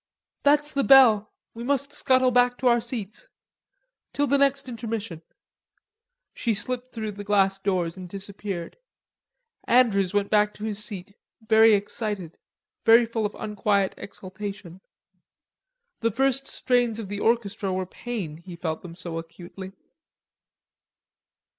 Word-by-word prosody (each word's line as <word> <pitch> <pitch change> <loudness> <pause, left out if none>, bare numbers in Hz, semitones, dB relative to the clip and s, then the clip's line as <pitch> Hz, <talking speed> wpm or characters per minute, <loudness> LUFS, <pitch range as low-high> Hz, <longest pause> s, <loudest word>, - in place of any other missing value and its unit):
"There's 295 +1 +3
the 275 -1 0
bell, 235 -7 +6 0.2
we 230 - -7
must 280 +2 0
scuttle 260 -3 +3
back 245 0 +3
to 260 - 0
our 235 -1 +4
seats. 235 - -6 0.8
Till 290 - +1
the 280 0 +2
next 275 -1 +2
intermission." 225 -7 -5 1.1
She 230 -3 -1
slipped 250 +4 -2
through 220 -2 -4
the 205 0 -8
glass 195 -1 +2
doors 185 -3 -1
and 180 -1 -8
disappeared. 195 -2 -6 0.9
Andrews 210 -7 +3
went 205 -1 0
back 210 -1 +3
to 210 - -10
his 210 -1 -1
seat 200 -2 -5 0.3
very 220 0 +6
excited, 205 -4 -4 0.4
full 225 -1 +4
of 210 - -14
unquiet 205 -2 0
exultation. 190 -2 -8 1.2
The 230 - +1
first 270 +3 +1
strains 245 -3 +1
of 225 -3 -5
the 205 +1 -5
orchestra 210 -4 0
were 185 0 -2
pain, 185 -6 -6
he 170 +1 -11
felt 160 -2 -4
them 170 -2 -10
so 170 -2 -4
acutely. 175 +3 -10
210 Hz, 130 wpm, -25 LUFS, 195-245 Hz, 1.2 s, bell